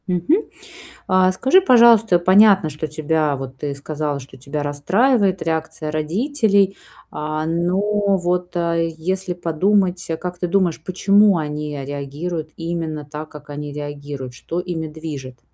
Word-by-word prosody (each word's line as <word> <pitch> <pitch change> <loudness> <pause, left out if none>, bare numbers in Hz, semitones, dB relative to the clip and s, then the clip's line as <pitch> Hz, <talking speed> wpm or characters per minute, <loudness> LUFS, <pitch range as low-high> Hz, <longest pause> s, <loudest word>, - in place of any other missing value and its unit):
Мгм. 185 - +1 0.6
А, 185 0 +4
скажи, 265 - +4
пожалуйста, 230 - +6
понятно, 190 -1 +5
что 150 +1 -5
тебя, 155 0 0
вот 135 -1 -7
ты 145 0 -4
сказала, 145 0 -3
что 130 0 -13
тебя 140 +3 -4
расстраивает 190 - +2
реакция 160 -1 -3
родителей, 200 - +1 0.3
а, 155 +1 -3
но 170 +3 0 0.4
вот, 180 0 -2
э, 170 -1 0
если 185 +2 -2
подумать, 180 +2 0
э, 160 - -1
как 180 0 -6
ты 180 - -1
думаешь, 175 -4 0
почему 200 +2 +4
они 150 -1 -4
реагируют 145 +4 -5
именно 165 -3 -4
так, 150 +1 -8
как 150 -1 -13
они 145 0 -6
реагируют? 145 -3 -7
Что 165 +8 -5
ими 175 -3 -4
движет? 150 -5 -8
165 Hz, 140 wpm, -20 LUFS, 150-185 Hz, 0.6 s, пожалуйста